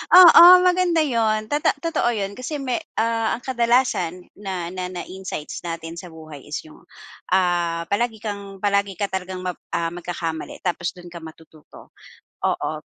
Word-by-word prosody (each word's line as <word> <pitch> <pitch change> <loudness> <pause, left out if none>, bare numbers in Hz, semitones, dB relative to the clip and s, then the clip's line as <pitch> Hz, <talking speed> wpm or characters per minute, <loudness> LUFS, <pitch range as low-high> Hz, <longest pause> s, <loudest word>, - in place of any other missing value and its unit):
Oo 355 -2 +10 0.2
maganda 360 -3 +3
yun 220 -5 0
to 295 - +1 0.2
totoo 330 -7 +1
yun. 200 -2 -2
Kasi 275 +4 -4
me 255 0 -1 0.2
ah, 225 0 +1
ang 245 - -17
kadalasan 235 -8 +1 0.2
na 185 -4 -4
na 185 -1 -4
na 180 -1 -6
insights 185 -5 -7
natin 165 0 -6
sa 180 - -9
buhay 155 -3 -11
is 150 - -4
yung, 155 - -16 0.5
ah, 175 -2 +1
palagi 225 +2 0
kang 200 -2 -6
palagi 200 -1 +1
ka 200 -1 -1
talagang, 185 -1 -4 0.3
ah, 165 0 -1
magkakamali 170 -2 -5
tapos 175 -1 -2
dun 175 -1 -12
ka 170 - -8
matututo. 160 -1 -15 0.5
Oo, - - 0
190 Hz, 155 wpm, -22 LUFS, 170-230 Hz, 0.5 s, Oo